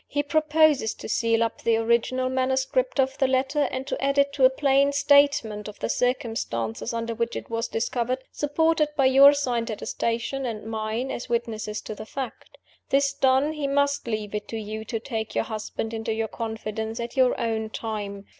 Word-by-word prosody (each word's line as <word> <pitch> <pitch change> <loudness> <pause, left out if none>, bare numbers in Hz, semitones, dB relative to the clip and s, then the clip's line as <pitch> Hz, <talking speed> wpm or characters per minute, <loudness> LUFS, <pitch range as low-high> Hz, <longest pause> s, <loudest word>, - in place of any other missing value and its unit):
"He 290 0 -1
proposes 305 -4 +3
to - - -8
seal 230 0 +2
up 230 - -3
the 230 - +2
original 235 +3 +1
manuscript 265 - 0
of 265 +1 +1
the 265 - +4
letter, 265 +3 +1
and 260 0 -4
to - - -4
add 275 0 +1
to 280 - +6
it 280 0 -3
a 260 -1 +7
plain 275 +1 +3
statement 280 -7 +3
of 210 - -9
the - - -3
circumstances 225 - -1
under 230 0 -3
which 235 +1 -2
it - - -7
was 230 +1 -1
discovered, 240 +2 -1
supported 305 +1 +1
by 270 - +4
your 275 +2 +8
signed 245 -5 -1
attestation 235 +4 -2
and 225 -4 -4
mine, 220 +3 -3
as 240 - -6
witnesses 225 -3 -2
to - - -6
the 215 +1 -9
fact. 265 -2 -7 0.3
This 275 0 +2
done, 265 +3 +2
he 300 -2 -2
must 285 -1 +1
leave 215 -2 -3
it 210 -1 -4
to 225 - -5
you 215 0 -5
to 225 +1 -3
take 220 -2 -5
your - - +2
husband 220 -1 -5
into 225 0 -3
your 225 0 -1
confidence, 220 0 -4
at 235 0 -5
your 255 -2 +3
own 220 -1 -1
time. 205 -3 -5
240 Hz, 190 wpm, -25 LUFS, 220-275 Hz, 0.3 s, your